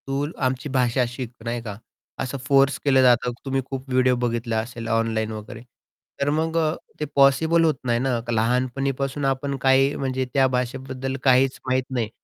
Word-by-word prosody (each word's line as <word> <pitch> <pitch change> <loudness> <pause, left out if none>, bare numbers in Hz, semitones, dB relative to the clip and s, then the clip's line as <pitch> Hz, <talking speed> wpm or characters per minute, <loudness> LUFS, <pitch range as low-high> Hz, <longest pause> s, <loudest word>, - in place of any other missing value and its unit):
तूल 140 +2 -2
आमची 130 +3 -2
भाषा 125 -1 +1
शिक 125 -1 -6
नाही 120 0 -2
का 105 -3 -7 0.4
असं 130 +2 -3
फोर्स 140 0 +4
केलं 135 -2 +5
जातं 125 -1 +4
तुम्ही 135 0 0
खूप 135 0 -6
व्हिडिओ 130 0 +3
बघितला 115 -1 -1
असेल 115 0 -6
ऑनलाइन 110 -1 0
वगैरे. 110 +2 -8 0.6
तर 140 - +2
मग 160 +2 0
अ, 160 -1 +1 0.2
ते 150 - -1
पॉसिबल 160 +5 +4
होत 160 -1 +3
नाही 120 -1 +1
ना 125 -2 0
लहानपणीपासून 130 +4 0
आपण 135 +1 -1
काही 135 +1 +4
म्हणजे 130 -1 -2
त्या 135 -1 +4
भाषेबद्दल 130 +1 -3
काहीच 130 0 +3
माहीत 130 0 +1
नाही 120 -4 -1
130 Hz, 165 wpm, -23 LUFS, 120-135 Hz, 0.6 s, केलं